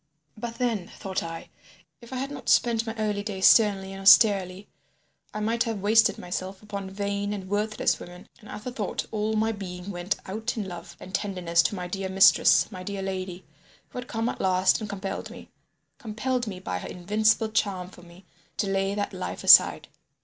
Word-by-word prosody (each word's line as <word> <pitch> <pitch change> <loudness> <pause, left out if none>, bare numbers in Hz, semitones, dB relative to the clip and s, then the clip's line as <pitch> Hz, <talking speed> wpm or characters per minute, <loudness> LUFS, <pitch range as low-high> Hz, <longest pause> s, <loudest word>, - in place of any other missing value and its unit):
But 230 +1 -6
then, 230 -8 -1
thought 190 -2 -5
I, 165 0 -7 0.5
if 235 - -14
I - - -5
had 270 +2 -3
not 265 -4 -6
spent 230 -1 +3
my 225 - -4
early 210 -2 -1
days 200 -2 -2
sternly 200 -4 +5
and 195 - -8
austerely, 195 -2 +5 0.6
I 215 - -5
might 230 +2 0
have 220 -4 -4
wasted 220 +1 +4
myself 185 +2 -6
upon 200 -2 -6
vain 200 +1 -3
and 195 -2 -6
worthless 210 +2 0
women, 180 +1 -11
and 210 - -15
at 210 0 -8
the 250 - -5
thought 215 -5 -3
all 215 0 -1
my 220 +1 +1
being 190 -2 -7
went 175 +1 -2
out 220 +4 -4
in 205 -3 -3
love 175 -2 -9
and 185 - -11
tenderness 180 -5 +1
to 185 - -1
my 180 -2 -5
dear 190 +1 -4
mistress, 190 +3 +5
my 185 -2 -8
dear 195 +1 -5
lady, 185 -2 -5 0.4
who - - -7
had 245 - -8
come 225 -1 -2
at - - -4
last 185 +2 +2
and 215 - -5
compelled 195 -1 -5
me—compelled 240 +3 -6
me 190 -3 -6
by 90 - -4
her - - -7
invincible 215 +4 +1
charm 195 -4 -1
for 180 - -15
me—to 175 +3 -9
lay 195 +1 0
that 205 -1 -3
life - - -5
aside. - - +7
200 Hz, 190 wpm, -26 LUFS, 185-220 Hz, 0.6 s, aside